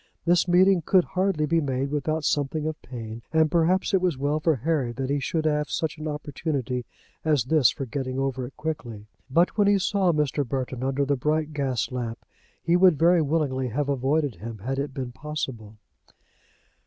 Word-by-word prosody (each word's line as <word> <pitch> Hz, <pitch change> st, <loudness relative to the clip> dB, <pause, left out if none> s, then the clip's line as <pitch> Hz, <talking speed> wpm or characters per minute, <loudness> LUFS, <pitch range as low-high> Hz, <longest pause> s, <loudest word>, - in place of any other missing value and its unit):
This 175 Hz, +1 st, +3 dB
meeting 180 Hz, +1 st, +5 dB
could 185 Hz, +3 st, +4 dB
hardly 185 Hz, -5 st, 0 dB
be 165 Hz, +2 st, +2 dB
made 135 Hz, -1 st, -2 dB
without 155 Hz, +2 st, -1 dB
something 145 Hz, +1 st, 0 dB
of 155 Hz, 0 st, -4 dB
pain, 115 Hz, -2 st, -7 dB
and 160 Hz, -1 st, +3 dB
perhaps 175 Hz, +4 st, +2 dB
it 190 Hz, -, +4 dB
was 180 Hz, -6 st, +1 dB
well 145 Hz, +3 st, 0 dB
for 155 Hz, 0 st, +2 dB
Harry 135 Hz, -1 st, 0 dB
that 135 Hz, +2 st, -3 dB
he 145 Hz, -, +1 dB
should 155 Hz, +3 st, -2 dB
have 150 Hz, -1 st, +1 dB
such 160 Hz, -1 st, -2 dB
an 155 Hz, -, -4 dB
opportunity 145 Hz, -4 st, -3 dB, 0.4 s
as 150 Hz, -6 st, +2 dB
this 140 Hz, 0 st, +4 dB
for 135 Hz, -, -4 dB
getting 130 Hz, +1 st, -4 dB
over 135 Hz, -2 st, -2 dB
it 135 Hz, -, -16 dB
quickly. 130 Hz, -9 st, -5 dB, 0.2 s
But 170 Hz, +9 st, +2 dB
when 205 Hz, -, +5 dB
he 200 Hz, 0 st, +5 dB
saw 190 Hz, -1 st, +2 dB
Mr. 150 Hz, -2 st, 0 dB
Burton 130 Hz, -1 st, -4 dB
under 135 Hz, +1 st, 0 dB
the 140 Hz, +1 st, +1 dB
bright 150 Hz, +3 st, -1 dB
gas 135 Hz, -5 st, -1 dB
lamp 120 Hz, -2 st, -5 dB, 0.4 s
he 170 Hz, 0 st, +3 dB
would 180 Hz, -3 st, +5 dB
very 170 Hz, +2 st, +4 dB
willingly 140 Hz, -4 st, 0 dB
have 140 Hz, +5 st, -2 dB
avoided 140 Hz, -, 0 dB
him, 110 Hz, +4 st, -7 dB
had 130 Hz, +7 st, -3 dB
it 140 Hz, 0 st, -2 dB
been 130 Hz, -2 st, -5 dB
possible. 130 Hz, -6 st, -6 dB
145 Hz, 190 wpm, -25 LUFS, 130-160 Hz, 0.4 s, meeting